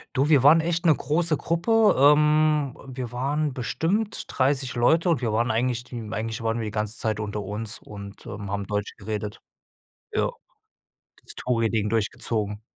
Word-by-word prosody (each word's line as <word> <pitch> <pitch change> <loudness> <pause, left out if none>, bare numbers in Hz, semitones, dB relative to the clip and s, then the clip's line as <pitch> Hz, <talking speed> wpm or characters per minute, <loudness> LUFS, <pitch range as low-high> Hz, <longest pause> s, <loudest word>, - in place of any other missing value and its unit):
Du, 135 +3 +2
wir 145 -5 +5
waren 150 +4 +7
echt 170 +1 -1
'ne 160 - +7
große 155 +3 0
Gruppe. 215 +6 +3
Ähm, 150 0 +4
wir 125 -2 -6
waren 145 +3 -1
bestimmt 190 - -1
30 130 -1 0
Leute 160 +9 +3
und 155 -7 +2
wir 115 -3 0
waren 115 +3 +1
eigentlich 120 +1 0
die 120 -2 -7
eigentlich 110 +1 -3
waren 115 +1 -1
wir 115 - -3
die 105 - -4
ganze 105 +1 -3
Zeit 110 -1 -1
unter 105 0 -3
uns 105 +3 -5
und, 100 -1 -11
ähm, 105 -4 -6
haben 100 -1 -3
Deutsch 105 0 -2
geredet. 105 0 -5 0.7
Ja, - - +1 0.9
das - - -7
Touri-Ding 115 -3 0
durchgezogen. 105 -1 -2
120 Hz, 165 wpm, -25 LUFS, 110-150 Hz, 0.9 s, waren